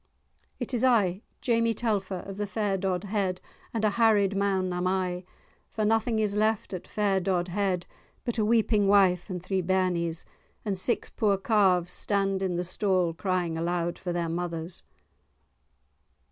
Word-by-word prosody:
"It 245 0 -4
is 245 0 0
I, 205 -7 +3 0.2
Jamie 230 -2 +2
Telfer, 200 -5 -1
of 195 0 -7
the 205 0 -2
fair 200 0 -1
Dodhead, 190 0 -1 0.3
and 220 -2 -1
a 210 - +3
harried 205 -3 +3
man 190 -2 0
am 180 +1 -1
I, 185 -1 -1 0.4
for 215 - -2
nothing 225 +1 +2
is 210 -2 0
left 215 -1 0
at 180 - -6
fair 200 -2 +1
Dodhead 180 0 -1 0.4
but 240 -2 -1
a - - +3
weeping 215 -2 +3
wife 195 -2 +4
and 180 -2 -5
three 190 0 0
bairnies, 175 -2 0 0.4
and 205 -2 0
six 190 +6 +1
poor 205 -3 +1
calves 190 -4 +2
stand 195 -1 0
in 185 -2 -1
the 175 - -1
stall 185 -1 0
crying 175 -2 -1
aloud 170 0 -1
for 180 - -4
their 175 -1 -1
mothers." 170 0 -4
195 Hz, 155 wpm, -27 LUFS, 180-210 Hz, 0.4 s, wife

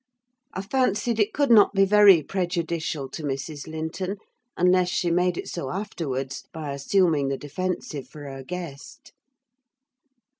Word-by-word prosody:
I 190 - -3
fancied 230 -1 0
it 210 0 +2
could 285 -3 +1
not 210 -3 +7
be 195 0 +5
very 200 -5 +7
prejudicial 170 -4 -2
to 160 - -7
Mrs. 145 +1 -4
Linton; 160 +5 -4 0.4
unless 180 0 +3
she 175 -1 0
made 180 +1 +2
it - - -5
so 135 - -4
afterwards, 150 -9 -4
by 155 -3 -5
assuming 150 0 +2
the 135 0 -1
defensive 150 -1 -4
for 150 - -11
her 135 -1 -7
guest. 165 -2 -8
170 Hz, 140 wpm, -25 LUFS, 145-195 Hz, 0.4 s, not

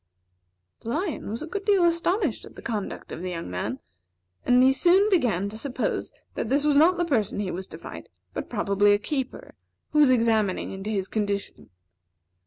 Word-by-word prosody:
The 225 - -8
lion 320 - -2
was 225 +7 -4
a - - -4
good 395 +5 -5
deal 395 -3 +3
astonished 340 - +1
at - - -13
the - - -11
conduct 215 -4 -4
of - - -6
the 185 - -3
young 170 - -5
man; 90 - -3 0.7
and 250 +1 +6
he 265 +1 +6
soon 365 +8 +4
began 220 - +2
to 220 +2 -6
suppose 255 0 -2 0.2
that 220 - -3
this 280 +3 +2
was 295 -1 +3
not 330 +5 +5
the 350 - +1
person 220 - 0
he 200 -3 -2
was 190 +2 -5
to - - -10
fight, - - -10 0.2
but - - -5
probably 205 -2 +3
a - - +4
keeper, 265 +4 -4 0.4
who 300 - +2
was 290 -3 +7
examining 225 -5 +2
into 195 +2 -6
his 195 -3 -1
condition. 205 -2 -3
240 Hz, 195 wpm, -25 LUFS, 205-310 Hz, 0.7 s, was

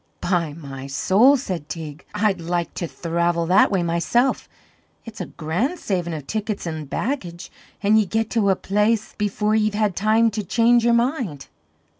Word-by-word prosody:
"By 170 -5 0
my 135 -4 -8
soul," 210 - +4
said 180 - -5
Teig, 155 -1 -7
"I'd 205 -4 +1
like 170 0 -2
to 170 - -4
thravel 170 0 -1
that 180 +3 +5
way 190 -3 +1
myself! 170 +10 0 0.6
It's 225 -1 -8
a - - -4
grand 175 - -2
savin' 180 - -2
of 155 -4 -6
tickets 215 +2 -3
an' 160 -2 -4
baggage; 180 - -4 0.3
an' 210 +2 +4
ye 215 -2 +3
get 225 +3 -1
to 215 -4 +2
a 190 - +4
place 210 +3 0
before 210 +1 0
ye've 215 -1 +1
had 210 -3 +1
time 220 +3 +3
to 210 0 -3
change 235 +4 +3
your 235 0 +4
mind. 235 - -1
195 Hz, 170 wpm, -22 LUFS, 170-220 Hz, 0.6 s, that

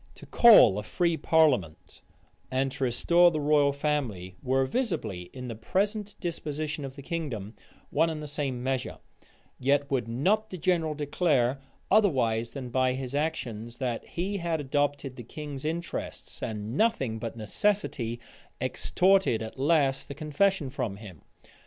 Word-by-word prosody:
To - - -12
call 210 - +7
a - - -3
free 170 +9 0
parliament, 145 - +1 0.5
and 135 +1 0
to 135 0 -4
restore 170 +8 +4
the 155 -2 -2
royal 145 -1 +3
family, 135 -11 -2
were 130 +1 +1
visibly, 135 - -2
in 125 -1 -7
the 120 - -4
present 200 - -1
disposition 155 -3 -4
of 135 -1 -7
the 140 - -10
kingdom, 130 - -4 0.4
one 165 +3 +3
and 160 -1 -4
the 150 - -6
same 140 -4 -3
measure: 130 -1 -2 0.6
yet 140 +2 +1
would 125 -4 0
not 190 - +1
the 185 - -6
general 165 -2 +1
declare, 145 -4 +1 0.3
otherwise 125 - +3
than 130 -3 -7
by 130 +1 +2
his 130 0 -5
actions, 120 -7 -3
that 125 -3 -2
he 195 +4 -3
had 170 -3 -1
adopted 145 -1 -1
the 120 - -7
king's 145 +3 -7
interests; 170 +2 -5
and 110 +1 -4
nothing 135 - +1
but 115 0 -5
necessity 120 - -1 0.4
extorted 185 - +2
at 110 +4 -8
last 140 -2 +2
the 140 - -7
confession 155 0 0
from 115 -7 -3
him. 100 - -11
140 Hz, 150 wpm, -28 LUFS, 120-165 Hz, 0.6 s, call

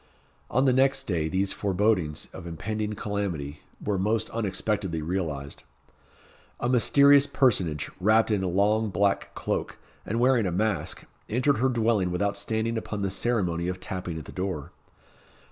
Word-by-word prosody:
On 130 +4 +2
the 130 - +4
next 135 +1 +3
day, 85 -10 -1
these 95 +3 0
forebodings 95 -6 0
of 90 -2 -8
impending 105 +5 -3
calamity 95 -9 -3 0.2
were 100 -2 -1
most 110 +4 0
unexpectedly 105 -4 -1
realised. 75 -5 -3 1.0
A 120 - -1
mysterious 140 +3 +5
personage, 85 - +1
wrapped 110 +4 +3
in 105 -2 +1
a 95 - -1
long 105 +4 +2
black 100 +1 0
cloak, - - -3 0.3
and 115 +3 -2
wearing 125 -4 +3
a - - -1
mask, 105 +4 -1 0.3
entered 130 +3 +2
her 130 +2 +3
dwelling 115 -6 +1
without 100 +3 0
standing 110 +2 -1
upon 105 -2 -5
the 95 - 0
ceremony 90 -7 0
of 90 0 -3
tapping 90 -3 -4
at 80 - -7
the - - -10
door. 90 -6 -4
100 Hz, 150 wpm, -27 LUFS, 90-115 Hz, 1.0 s, mysterious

